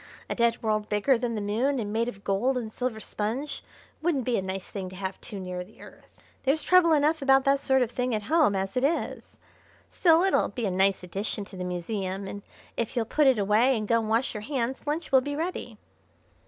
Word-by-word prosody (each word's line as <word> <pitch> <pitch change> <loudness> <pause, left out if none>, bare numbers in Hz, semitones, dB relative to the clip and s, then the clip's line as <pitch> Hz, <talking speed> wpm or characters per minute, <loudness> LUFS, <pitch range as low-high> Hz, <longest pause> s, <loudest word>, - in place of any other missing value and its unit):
A - - +2
dead 235 -1 +1
world 215 -1 0
bigger 210 +6 +3
than 235 -1 -2
the 210 - -2
Moon, 235 +8 0
and 210 -3 -3
made 230 +2 +1
of 200 -4 -11
gold 245 +7 +1
and 220 -3 -5
silver 250 -3 -3
sponge, 230 +8 -4 0.4
wouldn't 310 -5 +1
be 245 - +1
a - - +1
nice 190 0 -5
thing 190 -2 -5
to 185 - -11
have 190 0 -5
too 205 - -7
near 180 -1 -5
the 200 +4 -20
Earth. - - -14 0.3
There's 280 +4 +1
trouble 365 -2 +5
enough 305 +1 +2
about 270 -1 +5
that 275 +1 +2
sort 265 -1 +3
of 235 - -4
thing 250 -1 -1
at 210 - -3
home 300 -3 +3
as 195 0 -2
it 250 - +1
is. 315 +5 -2 0.5
Still, 335 -1 +4
it'll 385 - +2
be 240 -4 -3
a 195 - 0
nice 190 +1 +2
addition 200 +3 -3
to 195 - -12
the 185 - -5
museum, 190 +2 -3
and 200 +1 -6 0.3
if 230 +2 -3
you'll 235 -2 +1
put 295 +6 +2
it 260 -3 +5
away 215 +6 +3
and 215 -1 -3
go 230 +1 +3
and 220 -1 -3
wash 230 +4 +1
your 210 - -5
hands 260 +2 -3
lunch 305 +2 -2
will 265 -1 +6
be 285 +2 -4
ready." 335 +4 -4
230 Hz, 230 wpm, -27 LUFS, 200-270 Hz, 0.5 s, will